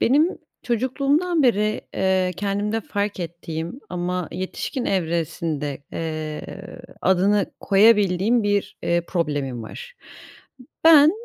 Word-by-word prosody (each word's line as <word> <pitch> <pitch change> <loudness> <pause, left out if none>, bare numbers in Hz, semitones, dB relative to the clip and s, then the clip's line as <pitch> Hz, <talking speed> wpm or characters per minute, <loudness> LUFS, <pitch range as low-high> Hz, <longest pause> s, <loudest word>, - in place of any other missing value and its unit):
Benim 300 +8 +3 0.2
çocukluğumdan 280 +7 +1
beri, 215 -3 +2
eee, 185 -1 +1
kendimde 205 +3 -1
fark 205 -2 -3
ettiğim 170 - -5
ama 180 -1 -2
yetişkin 185 +8 -4
evresinde, 160 -5 -2
eee, 155 -2 -4 0.6
adını 190 +2 +3
koyabildiğim 205 +1 +4
bir, 205 -1 0
eee, 170 0 +2
problemim 145 -8 -2
var. 485 - -9 0.9
Ben, 315 -2 +8
195 Hz, 95 wpm, -23 LUFS, 170-230 Hz, 0.9 s, Ben